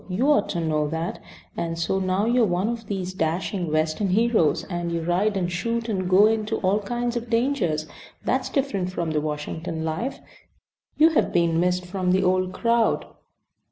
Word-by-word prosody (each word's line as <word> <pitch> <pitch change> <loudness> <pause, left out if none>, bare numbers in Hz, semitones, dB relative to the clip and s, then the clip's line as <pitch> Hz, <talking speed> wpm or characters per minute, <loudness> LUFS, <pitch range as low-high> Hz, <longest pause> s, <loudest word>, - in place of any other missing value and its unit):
You 240 +11 +2
ought 210 -8 +2
to 175 - -2
know 155 -2 0
that. 160 +3 -3 0.4
And 165 0 -3
so 170 +3 0
now 190 +2 0
you 240 +2 +3
are - - +5
one 180 +4 0
of 230 -2 -5
these 190 -2 -3
dashing 175 0 -2
Western 155 +5 0
heroes, 210 -5 +2
and 175 -2 -4
you 170 -1 -2
ride 195 +5 +1
and 180 -2 -1
shoot 230 +6 -2
and 185 -5 -1
go 190 +3 +6
into 220 0 +1
all 195 +2 +2
kinds 240 +3 -2
of 240 0 -4
dangers. 230 - +1 0.4
That's 260 0 0
different 200 -10 -1
from 170 -3 -2
the 150 -1 0
Washington 160 +2 -4
life. 165 +12 -3 0.8
You 315 +2 +7
have 320 - +1
been 170 -1 +2
missed 180 +1 +1
from 180 0 -1
the 190 +1 +2
old 185 0 +1
crowd." 230 +3 +1
185 Hz, 185 wpm, -24 LUFS, 170-225 Hz, 0.8 s, You